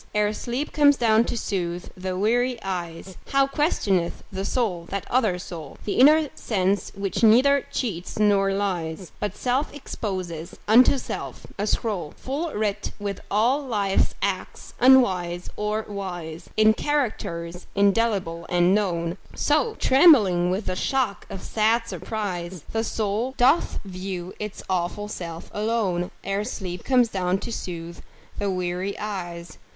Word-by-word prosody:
Ere 210 0 +2
sleep 245 +7 -3
comes 290 -1 +5
down 225 -1 +4
to 240 - -3
soothe 175 -4 -3
the 185 0 -4
weary 240 +5 +2
eyes, 180 -1 -5
How 275 0 +3
questioneth 205 - 0
the 190 0 -3
soul 195 -8 -1
that 200 -1 -3
other 220 -8 +2
soul, 165 -5 -8
The 205 - -1
inner 300 +3 +6
sense 200 -2 0
which 195 -2 -2
neither 255 +5 +5
cheats 190 -9 -3
nor 200 -2 +3
lies, 185 -3 -2
But 210 -1 -3
self 260 +4 0
exposes 185 - -5
unto 250 +6 +6
self, - - -6
a 205 - 0
scroll 195 -9 -2
Full 300 +5 -3
writ 210 -1 -1
with 200 -2 -4
all 235 +8 +2
life's 205 -7 +1
acts 195 -2 -3
unwise 185 -9 +4
or 210 +1 -1
wise, 175 -5 -6
In 215 0 +6
characters 180 -12 -2
indelible 200 -5 +1
and 175 +1 +4
known; 175 -3 0 0.2
So, 310 +10 +1
trembling 220 - +5
with 190 +3 -1
the 185 - -2
shock 250 0 -1
of 190 - -7
sad 225 +2 +2
surprise, 185 -3 -4
The 225 0 0
soul 225 +4 -1
doth 265 +7 +3
view 185 -1 -5
its 210 -1 -6
awful 185 +3 -1
self 170 -4 -7
alone, 210 -5 0
Ere 195 +1 -1
sleep 185 -6 -5
comes 250 -3 +3
down 185 -2 0
to - - -5
soothe 170 -5 -6 0.4
the 205 -1 0
weary 185 +1 -2
eyes. 175 -5 -6
200 Hz, 140 wpm, -24 LUFS, 180-230 Hz, 0.4 s, inner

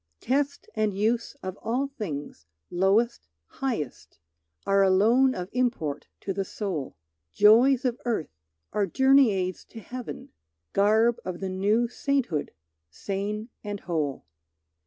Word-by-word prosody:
Test 285 - -1
and 210 -3 0
use 230 +5 0
of 185 +1 -5
all 250 +5 0
things, 155 - -6 0.2
lowest, 195 - +2 0.2
highest, 230 - -4 0.5
Are 195 0 +3
alone 225 +8 +4
of 180 0 -4
import 235 - -1
to 195 - -3
the 195 +1 -1
soul; 185 - -4 0.4
Joys 240 +5 +6
of 245 -1 0
earth 225 - -2 0.4
are 205 -2 +1
journey 265 +4 +5
aids 185 -2 -2
to 225 - -11
heaven, 250 +2 -7 0.4
Garb 220 +4 +3
of 180 -2 -5
the 190 - -3
new 205 +6 +2
sainthood 245 - -1 0.4
sane 205 - -4
and 205 -1 -5
whole. 155 -6 -2
210 Hz, 125 wpm, -27 LUFS, 185-245 Hz, 0.5 s, Joys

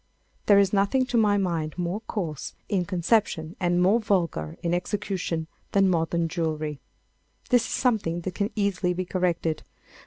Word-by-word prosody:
There 205 - +7
is 200 -1 +4
nothing 205 +7 +3
to 250 -1 -4
my 210 -3 +4
mind 170 -5 -1
more 180 +4 -2
coarse 170 -10 -4
in 185 -3 0
conception 175 -3 0
and 175 -1 +2
more 200 +6 +4
vulgar 170 - -1
in 170 0 0
execution 180 -3 -2 0.3
than 195 -1 +4
modern 170 -1 +1
jewellery. 155 -3 -2 0.7
This 245 -2 +4
is - - -7
something 205 -9 +1
that 180 +1 -4
can 200 +2 -1
easily 195 -4 0
be 185 +1 -2
corrected. 175 -3 0
180 Hz, 155 wpm, -26 LUFS, 165-205 Hz, 0.7 s, There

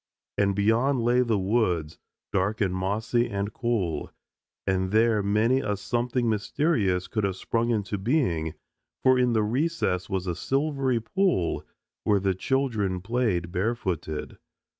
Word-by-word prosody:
And 100 -1 +2
beyond 115 +6 +2
lay 120 +2 +3
the 115 -4 +1
woods, 95 -6 0 0.3
dark 100 +3 0
and 95 -4 +1
mossy 110 +6 0
and 100 +1 -3
cool, 100 -10 -1 0.5
and 95 -1 0
there 110 +1 +3
many 110 +6 +2
a 105 -6 -1
something 120 +3 -1
mysterious 105 - +1
could 110 - -2
have 95 -2 0
sprung 115 +4 -1
into 105 -3 -1
being, 95 - 0 0.5
for 130 -1 +5
in 125 -1 +3
the 110 -1 +2
recess 120 - 0
was 95 -2 -2
a 90 - -1
silvery 135 - 0
pool 175 - 0 0.4
where 105 -2 +3
the 95 0 +1
children 105 -4 0
played 100 -6 0
barefooted. 95 -6 -2
105 Hz, 140 wpm, -26 LUFS, 95-120 Hz, 0.5 s, for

